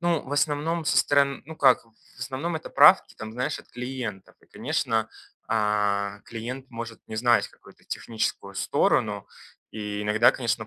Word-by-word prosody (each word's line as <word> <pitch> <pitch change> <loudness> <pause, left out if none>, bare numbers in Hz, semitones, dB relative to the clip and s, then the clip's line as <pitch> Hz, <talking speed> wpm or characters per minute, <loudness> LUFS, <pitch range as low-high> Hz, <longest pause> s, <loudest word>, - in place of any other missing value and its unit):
Ну, 170 -3 +1
в 135 - -7
основном, 150 +3 0
со - - +1
сторон 140 -1 +2
ну 160 0 -9
как, 130 -5 +4
в 115 - -27 0.3
основном 135 +7 -3
это 160 - -8
правки - - +6
там, 110 0 -8
знаешь, 125 +2 -2
от - - -15
клиентов. 125 -5 -6
И - - -24
конечно, 110 -1 -1 0.4
а, 105 -2 0
клиент 125 +4 -7
может 115 -1 -7
не 110 - -6
знать 120 +1 +3
какую-то - - -20
техническую 110 -3 -3
сторону, - - +1 0.4
и 105 -1 -4
иногда, 110 +3 +4
конечно, 115 -3 -2
120 Hz, 160 wpm, -26 LUFS, 110-140 Hz, 0.4 s, правки